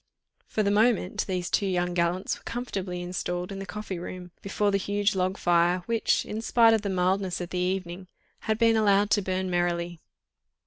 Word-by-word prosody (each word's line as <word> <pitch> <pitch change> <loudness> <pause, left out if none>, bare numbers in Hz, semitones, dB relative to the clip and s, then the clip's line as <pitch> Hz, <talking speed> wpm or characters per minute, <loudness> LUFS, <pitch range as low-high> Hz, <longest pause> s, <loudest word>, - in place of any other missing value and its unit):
For 215 - 0
the 200 - +2
moment 210 -3 +2
these 180 -2 -2
two 200 - +2
young 180 -1 0
gallants 175 +2 0
were - - -17
comfortably 195 -7 -4
installed 180 0 -3
in 195 - -5
the 195 - -6
coffee 210 -4 -5
room, 180 0 -8
before 205 +1 0
the 200 - +1
huge 205 +1 0
log 185 0 0
fire, 175 +1 +2
which, 230 -1 +1
in 215 +1 -4
spite 230 0 +5
of 220 - +2
the 205 - -3
mildness 185 0 0
of 175 -1 -6
the 180 - -2
evening, 185 0 -2 0.3
had 220 -1 -1
been 230 0 +4
allowed 205 -1 +3
to 205 - +4
burn 185 0 -2
merrily. 175 -1 -1
190 Hz, 190 wpm, -27 LUFS, 180-205 Hz, 0.3 s, spite